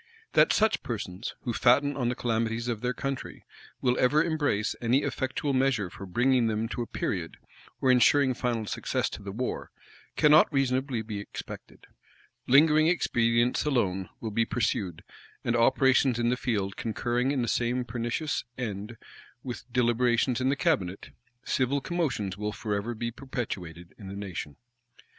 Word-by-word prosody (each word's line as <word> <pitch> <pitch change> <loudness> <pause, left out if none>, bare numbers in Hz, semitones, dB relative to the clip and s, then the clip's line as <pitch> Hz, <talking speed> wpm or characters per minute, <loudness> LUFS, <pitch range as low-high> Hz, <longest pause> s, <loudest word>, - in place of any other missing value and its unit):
That - - +5
such 220 0 +2
persons, 100 -3 -5
who 120 - -3
fatten 140 +5 +3
on 125 -3 0
the 125 - -1
calamities 115 0 -1
of 115 -3 -2
their 125 0 0
country, 135 +1 -5 0.4
will 125 -1 +2
ever 150 +5 +4
embrace 145 -10 0
any 120 +4 +2
effectual 135 +2 -2
measure 130 -8 +1
for 100 - -9
bringing 120 +4 +2
them 110 0 -1
to 120 - -3
a 120 - -3
period, 85 -4 -3 0.4
or 130 - +4
insuring 130 +2 +5
final 120 -3 -2
success - - -2
to - - -7
the 100 -1 -6
war, 125 +5 -3 0.5
cannot 150 +2 +6
reasonably 130 -3 0
be 105 -2 -5
expected. 100 - -9 0.6
Lingering 155 +3 +6
expedients 120 -7 +2
alone 95 -10 0
will 110 - -4
be 115 +2 +2
pursued; 100 -7 -2 0.4
and 120 - 0
operations 130 +1 +4
in 120 0 +1
the 125 - +2
field 105 -7 -2
concurring 120 +3 -1
in 135 -4 0
the - - -2
same 125 +2 0
pernicious 120 +5 -2
end 110 -2 -5 0.5
with 125 -1 -7
deliberations 120 +1 +2
in 130 - +2
the 140 - +2
cabinet, 130 - -1 0.3
civil 135 +2 +1
commotions 135 - -2
will 105 +1 -3
forever 105 +2 -3
be 115 +1 -3
perpetuated 95 - -6
in 100 - -9
the 95 - -7
nation. 95 -7 -6
120 Hz, 155 wpm, -28 LUFS, 110-130 Hz, 0.6 s, cannot